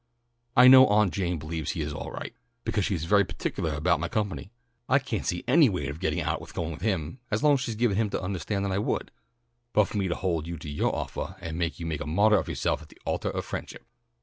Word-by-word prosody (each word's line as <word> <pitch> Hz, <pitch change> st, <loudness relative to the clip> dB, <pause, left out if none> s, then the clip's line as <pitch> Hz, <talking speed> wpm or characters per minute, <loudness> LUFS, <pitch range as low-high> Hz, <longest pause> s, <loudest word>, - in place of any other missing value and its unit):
I 125 Hz, +1 st, +9 dB
know 130 Hz, 0 st, +10 dB
Aunt 105 Hz, -2 st, +3 dB
Jane 90 Hz, -3 st, -1 dB
believes 80 Hz, +1 st, -4 dB
he 85 Hz, -, -3 dB
is 75 Hz, 0 st, -3 dB
all -, -, -5 dB
right, -, -, -7 dB, 0.3 s
because 105 Hz, -4 st, 0 dB
she 100 Hz, -, 0 dB
is 80 Hz, -1 st, -3 dB
very 100 Hz, +3 st, +5 dB
particulah 80 Hz, -4 st, -3 dB
about 80 Hz, +1 st, +2 dB
my 85 Hz, -, -2 dB
company. 100 Hz, +1 st, -3 dB, 0.4 s
I 140 Hz, -, +6 dB
can't 130 Hz, -7 st, -3 dB
see 90 Hz, -, -1 dB
any 160 Hz, -6 st, +6 dB
way 90 Hz, -8 st, -2 dB
to 70 Hz, -, -3 dB
get 80 Hz, -, -2 dB
out -, -, -1 dB
of -, -, -12 dB
going 85 Hz, -1 st, -2 dB
with 80 Hz, -, -8 dB
him 95 Hz, -, -2 dB
as 110 Hz, -, -1 dB
long 150 Hz, -1 st, +6 dB
as 140 Hz, -, +2 dB
she's 115 Hz, -2 st, -3 dB
given 110 Hz, -3 st, +1 dB
him 110 Hz, -2 st, +1 dB
to -, -, -2 dB
undahstand 95 Hz, +2 st, -2 dB
that 100 Hz, -, -1 dB
I 95 Hz, -, 0 dB
would, -, -, -2 dB, 0.6 s
but 105 Hz, -, +5 dB
for -, -, -5 dB
me 95 Hz, -, 0 dB
to 85 Hz, -, -1 dB
hold 85 Hz, -4 st, -1 dB
you 85 Hz, 0 st, -5 dB
to 80 Hz, -, -9 dB
yoah 75 Hz, -, +1 dB
offah 95 Hz, -, -4 dB
and 85 Hz, -3 st, -5 dB
make 85 Hz, 0 st, -2 dB
you 85 Hz, -, -5 dB
make 80 Hz, -3 st, -3 dB
a -, -, -4 dB
martyr 100 Hz, +6 st, +4 dB
of 80 Hz, -, -5 dB
yoahself -, -, -1 dB
on -, -, -13 dB
the -, -, -18 dB
altah -, -, -1 dB
of -, -, -4 dB
friendship." -, -, -7 dB
95 Hz, 260 wpm, -27 LUFS, 80-105 Hz, 0.6 s, know